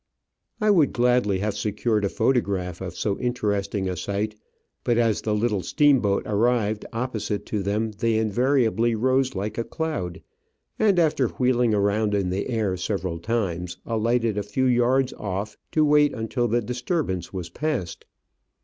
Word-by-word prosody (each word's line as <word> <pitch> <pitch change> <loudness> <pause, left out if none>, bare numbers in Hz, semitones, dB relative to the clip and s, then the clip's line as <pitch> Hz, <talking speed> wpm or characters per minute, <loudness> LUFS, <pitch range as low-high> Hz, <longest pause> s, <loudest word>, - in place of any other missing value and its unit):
I 215 -1 +3
would 165 -8 +4
gladly 120 -5 +2
have 105 0 -1
secured 105 +1 0
a 100 - +1
photograph 100 -8 0
of 90 -2 -5
so 100 +1 -1
inter 120 -4 -1
esting 100 -1 -1
a 90 - -2
sight, 100 +4 -2 0.5
but 120 -1 +1
as 115 -3 +2
the 105 -1 0
little 105 -2 0
steamboat 130 - +3
arrived 110 0 +1
oppo 115 -1 -3
site 105 0 -3
to 105 - -2
them 105 +3 -1
they 110 +2 0
invariably 115 0 +2
rose 130 +3 +1
like 105 +4 -3
a - - +1
cloud, 115 - -4 0.6
and, 205 -4 +3
after 150 -6 +3
wheeling 125 -2 +1
around 105 +1 +1
in 95 -3 0
the 95 +6 -2
air 110 -6 0
several 90 -2 -3
times, 90 -4 -2
alighted 115 -1 0
a - - 0
few 105 +6 -1
yards 125 +1 +2
off 100 +1 -4 0.2
to 155 -1 +4
wait 150 0 +4
until 120 +2 -1
the 120 +1 +1
disturbance 125 - -2
was 90 -3 -6
passed. 145 - -3
110 Hz, 160 wpm, -24 LUFS, 100-125 Hz, 0.6 s, would